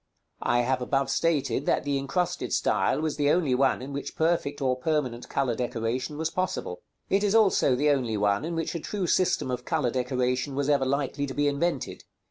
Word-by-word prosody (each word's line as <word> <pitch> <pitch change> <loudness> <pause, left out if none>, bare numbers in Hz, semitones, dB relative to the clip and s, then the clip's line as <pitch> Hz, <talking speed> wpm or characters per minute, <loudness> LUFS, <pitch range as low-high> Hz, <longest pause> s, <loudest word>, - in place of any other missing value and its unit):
I 120 0 +2
have 130 +1 0
above 135 +2 0
stated 150 -4 0
that - - +2
the 140 -1 0
incrusted 175 +6 -2
style 105 +8 +1
was 155 -2 -2
the 145 -1 +2
only 155 -5 +2
one 130 0 +2
in 140 +2 -7
which 140 - -5
perfect 160 -3 0
or 130 -2 +1
permanent 130 -3 -2
color 130 -3 0
decoration 125 +4 -3
was 160 +1 -1
possible. 460 - -3 0.3
It 195 +1 +3
is 205 +1 +2
also 195 - +4
the 145 +3 +3
only 125 -6 0
one 100 +2 +1
in 165 +1 -3
which 165 +2 -2
a 170 - -3
true 195 +4 -3
system 175 -7 +1
of 125 0 -3
color 150 -6 0
decoration 125 +1 -1
was 140 +1 0
ever 140 -2 +3
likely 140 +1 -1
to 135 - -6
be 145 0 +2
invented. 145 0 -1
140 Hz, 200 wpm, -27 LUFS, 125-160 Hz, 0.3 s, also